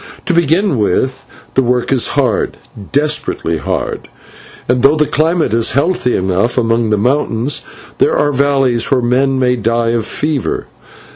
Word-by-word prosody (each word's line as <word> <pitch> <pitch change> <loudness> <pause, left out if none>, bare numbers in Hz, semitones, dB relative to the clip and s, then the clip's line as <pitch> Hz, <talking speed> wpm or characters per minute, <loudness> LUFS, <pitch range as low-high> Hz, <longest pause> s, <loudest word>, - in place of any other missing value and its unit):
To 185 - +2
begin 170 - +2
with, 130 +6 -1 0.3
the 135 - +3
work 125 0 0
is 130 - +2
hard, 125 -7 0 0.3
desperately 145 - 0
hard, - - -4 0.6
and 125 0 +1
though 140 +4 +5
the 150 0 +2
climate 160 -3 0
is 115 0 +2
healthy 140 -4 +1
enough 95 +6 0
among 115 -1 +1
the 105 - +2
mountains, 125 +2 0 0.4
there - - +2
are 145 0 +1
valleys 135 -4 +1
where 135 -3 +2
men 130 +3 +1
may 125 -1 +2
die 115 0 0
of 115 -2 -1
fever. 150 -5 -2
125 Hz, 150 wpm, -14 LUFS, 115-145 Hz, 0.6 s, though